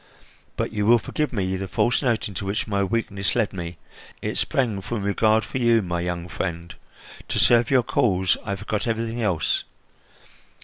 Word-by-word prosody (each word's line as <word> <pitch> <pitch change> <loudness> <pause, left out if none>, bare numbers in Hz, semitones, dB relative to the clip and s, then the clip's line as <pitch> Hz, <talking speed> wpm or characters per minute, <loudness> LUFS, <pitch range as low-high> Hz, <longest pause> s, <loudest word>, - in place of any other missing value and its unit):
But - - -1
you 105 -1 0
will 120 +1 +7
forgive 150 +6 -2
me 95 -5 -1
the 95 +1 -4
false 120 +5 +1
note 120 -6 +1
into 100 -1 -5
which 100 +2 -1
my 100 -2 0
weakness 100 -2 -1
led 115 -4 +1
me; 85 -3 -6 0.4
it - - -3
sprang 115 -7 0
from 105 +1 -4
regard 110 +2 +2
for 130 - -4
you, 115 -3 +4
my 85 -1 -2
young 90 0 -3
friend. 85 -2 -4 0.5
To - - -2
serve 120 -1 +5
your 130 -3 +4
cause, 95 -6 +2
I 100 - -2
forgot 105 +3 -3
everything 115 +1 -2
else. 95 -8 +1
105 Hz, 175 wpm, -24 LUFS, 95-115 Hz, 0.5 s, will